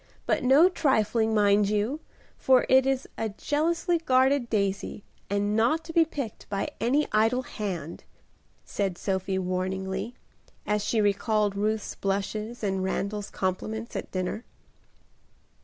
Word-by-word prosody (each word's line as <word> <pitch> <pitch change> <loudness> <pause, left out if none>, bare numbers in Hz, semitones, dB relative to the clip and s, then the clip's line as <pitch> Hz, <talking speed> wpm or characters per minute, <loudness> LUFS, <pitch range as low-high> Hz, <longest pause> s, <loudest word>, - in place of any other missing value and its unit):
But - - +1
no 275 +7 +6
trifling, 225 - +1
mind 205 -1 +4
you, 215 +8 0 0.4
for 260 -1 +3
it 265 0 +5
is 270 0 0
a 225 - -1
jealously 330 - 0
guarded 260 -3 +2
daisy 200 -1 -1 0.3
and 205 +1 0
not 245 +9 +2
to 330 0 -8
be 330 -1 +5
picked 275 -8 -6
by 200 -1 -2
any 255 +8 +2
idle 225 +4 +2
hand," 185 - -5 0.6
said 195 -4 -2
Sophie 190 0 -1
warningly, 190 +4 -3 0.5
as 210 0 0
she 220 0 +1
recalled 205 0 +1
Ruth's 215 +1 -1
blushes 210 +4 -3
and 190 -2 0
Randal's 200 +2 -2
compliments 215 +5 -3
at - - -4
dinner. 185 +4 -3
215 Hz, 130 wpm, -27 LUFS, 200-255 Hz, 0.6 s, no